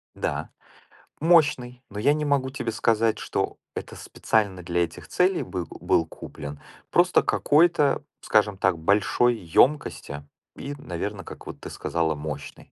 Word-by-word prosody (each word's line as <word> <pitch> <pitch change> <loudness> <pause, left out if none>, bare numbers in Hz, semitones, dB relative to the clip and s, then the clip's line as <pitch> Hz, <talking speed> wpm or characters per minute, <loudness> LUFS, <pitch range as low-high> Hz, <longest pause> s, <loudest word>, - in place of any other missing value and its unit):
Да, - - -3 0.7
мощный, 145 -7 +3
но 105 +1 -6
я 140 +6 +4
не 150 0 -1
могу 140 -2 +1
тебе 120 -4 -3
сказать, 115 0 +2
что - - -2 0.2
это - - -6
специально 100 -5 -1
для 85 0 +1
этих 80 - -7
целей 180 0 +2
был 90 -3 -4
был 80 - +1
куплен. 75 -2 -9 0.3
Просто - - +4
какой-то, 150 -2 +3 0.2
скажем 105 -2 +2
так, 95 -3 +2
большой 105 +7 +2
ёмкости 85 - +1 0.3
и, 140 - -6
наверно, 95 0 -5
как, - - -11
вот, - - -8
ты - - -8
сказала, 80 -2 -1
мощный. 75 -1 -7
105 Hz, 140 wpm, -25 LUFS, 85-140 Hz, 0.7 s, я